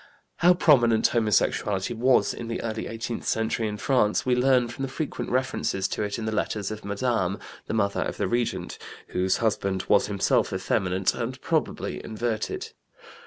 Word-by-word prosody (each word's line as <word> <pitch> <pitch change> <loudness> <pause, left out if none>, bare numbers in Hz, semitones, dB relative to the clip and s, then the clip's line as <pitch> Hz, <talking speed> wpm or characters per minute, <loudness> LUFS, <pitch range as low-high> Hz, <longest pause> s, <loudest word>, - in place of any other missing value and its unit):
How 180 +1 +5
prominent 120 -10 +4
homosexuality 105 -2 +1
was, 125 +3 +3
in 115 - -7
the 115 - -3
early 110 -1 -3
eighteenth 115 +1 -5
century 110 0 0
in 105 0 -4
France, 115 -4 +2
we 130 - +2
learn 125 -1 +3
from 120 +3 -8
the 135 - -1
frequent 150 +2 -4
references 125 -6 0
to - - -3
it 105 -1 -2
in 115 - -4
the 110 - -1
letters 105 -1 -2
of 110 0 -6
Madame, 100 -2 0 0.3
the - - -2
mother 100 -2 +1
of - - -3
the - - 0
Regent, 110 -7 -2 0.3
whose 95 +1 +1
husband 100 -4 0
was 100 - +4
himself 100 -2 +1
effeminate 95 0 0
and 125 +2 -4
probably - - -2
inverted. 110 0 -3
110 Hz, 165 wpm, -26 LUFS, 100-120 Hz, 0.3 s, How